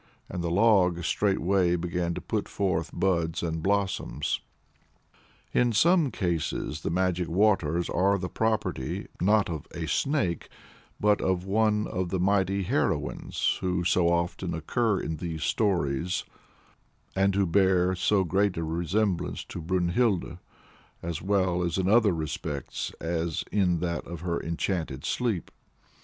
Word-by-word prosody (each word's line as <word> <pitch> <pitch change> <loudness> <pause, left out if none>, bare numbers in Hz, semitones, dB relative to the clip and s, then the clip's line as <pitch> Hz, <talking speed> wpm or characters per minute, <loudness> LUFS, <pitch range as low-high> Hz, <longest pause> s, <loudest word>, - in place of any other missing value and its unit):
And 90 -2 -4
the 85 - -1
log 90 -3 +3
straightway 95 -1 +2
began 85 0 -2
to - - -5
put - - -3
forth 85 -5 -1
buds 85 -3 0
and 80 -1 -2
blossoms. 95 -7 0 1.1
In 120 -1 +3
some 165 - +4
cases 85 -6 -2
the - - -2
magic 90 0 0
waters 85 -4 +2
are 100 +3 +2
the 90 -1 -3
property, 110 -12 -1 0.2
not 105 +3 +4
of 80 -3 -5
a 85 - -3
Snake, 95 - 0 0.5
but 105 0 +3
of 95 -1 0
one 105 +1 +2
of 90 -1 -2
the 95 - -1
mighty 95 +1 +2
heroines - - -1
who 90 -1 0
so 90 0 +3
often 85 0 -1
occur 105 - 0
in 80 - -3
these 80 -1 -4
stories, 90 -5 0 0.9
and 95 0 +2
who 100 -1 +3
bear 95 0 +3
so 95 +2 +2
great 95 +2 +1
a 85 - -1
resemblance 85 +4 -1
to 85 - -7
Brynhild, 90 +1 0 0.6
as 85 -2 -3
well 95 -2 +1
in 90 +2 0
other 110 0 +5
respects 75 -2 -4
as 85 -1 -2
in 90 -4 +2
that 85 -3 -2
of 85 -1 -7
her 85 -1 -2
enchanted 80 -4 -3
sleep. 115 -8 -1
90 Hz, 135 wpm, -27 LUFS, 85-100 Hz, 1.1 s, other